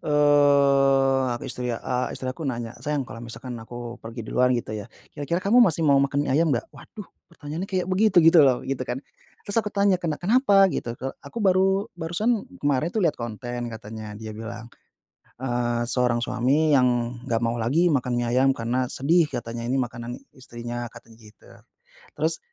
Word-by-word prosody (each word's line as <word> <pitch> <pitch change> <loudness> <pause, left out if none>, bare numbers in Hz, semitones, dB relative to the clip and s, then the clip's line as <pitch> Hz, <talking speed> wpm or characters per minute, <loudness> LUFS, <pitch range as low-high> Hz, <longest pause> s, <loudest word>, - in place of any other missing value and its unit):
eee, 140 -2 +4
ah 120 - -4
ke - - -6
istri 125 -1 -3
ya, 115 - -5
eee, 125 0 -2
istri 130 - -5
aku 145 +5 -5
nanya, 120 -3 -4
"sayang 145 -3 -2
kalau 115 +1 -9
misalkan 120 +2 -7
aku 120 +1 -8
pergi 115 +1 -9
duluan 125 0 +2
gitu 115 -3 -3
ya, 105 -1 -9 0.2
kira-kira 150 +4 -2
kamu 235 +6 +5
masih 160 -3 +1
mau 140 - +5
makan 140 +1 +2
mie 135 - +2
ayam 160 -1 +3
gak?" 120 - -2
Waduh 210 -4 -12 0.2
pertanyaannya 160 +2 -6
kayak 185 -3 -2
begitu-gitu 180 -5 +5
loh, 130 -3 +3
gitu 130 -1 -3
kan. 125 +1 -4 0.5
Terus 200 - -3
aku 210 -2 0
tanya, 200 -2 +3
"kena 165 -4 -3
kenapa 200 -1 +4
gitu?" 120 -9 -3
Kalo 135 +1 -5
aku 235 - -6
baru 195 +1 +2
barusan 200 +7 -1 0.2
kemarin 145 +3 0
tuh 220 - 0
lihat - - -3
konten 120 +1 -5
katanya 110 -1 -8
dia 110 -1 -7
bilang, 115 +1 -8 0.7
eee, 120 -2 -1
seorang 120 -1 +1
suami 130 +6 +1
yang 125 -3 +2
gak 115 -2 0
mau 115 +1 -1
lagi 160 +10 +2
makan 125 -4 0
mie 120 -1 -1
ayam 130 +2 +3
karena 125 +2 -1
sedih 160 +6 +2
katanya, 115 -3 -5
ini 130 - 0
makanan 120 -2 -3 0.2
istrinya, 120 -1 -7
katanya 115 -1 -15
gitu. 105 -1 -18 0.7
Terus - - 0
130 Hz, 180 wpm, -24 LUFS, 120-160 Hz, 0.7 s, kamu